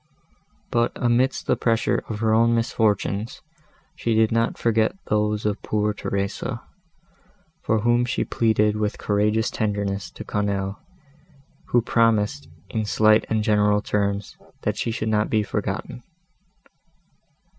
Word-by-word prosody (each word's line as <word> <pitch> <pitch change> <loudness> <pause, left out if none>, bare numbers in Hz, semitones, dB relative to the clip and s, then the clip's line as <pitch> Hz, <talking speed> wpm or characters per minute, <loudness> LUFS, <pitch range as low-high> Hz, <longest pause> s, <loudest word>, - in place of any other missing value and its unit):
But 120 0 +1
amidst 125 +2 +1
the - - +2
pressure 115 -1 +1
of 110 -1 -4
her 110 -1 +2
own 115 +1 +4
misfortunes, 110 -1 -1 0.5
she 115 -1 -1
did 110 0 +3
not 115 0 +1
forget 115 +2 +1 0.2
those 105 0 +1
of 105 0 -1
poor 105 0 0
Theresa, 100 +5 -3 1.0
for 110 -1 +1
whom 120 +2 +3
she 125 - -1
pleaded 105 -2 +2
with 105 -1 -1
courageous 105 +2 +1
tenderness 100 -2 -2
to - - -9
Quesnel, 100 -1 -2 0.9
who 120 -2 +2
promised, 115 +4 +1 0.2
in 110 -2 -1
slight 110 0 +3
and 110 -1 +1
general 105 -1 +2
terms, 100 -1 -1 0.3
that - - 0
she - - -2
should 110 -1 -3
not 105 0 +1
be 110 -1 +2
forgotten. 120 - -4
110 Hz, 130 wpm, -23 LUFS, 105-115 Hz, 1.0 s, own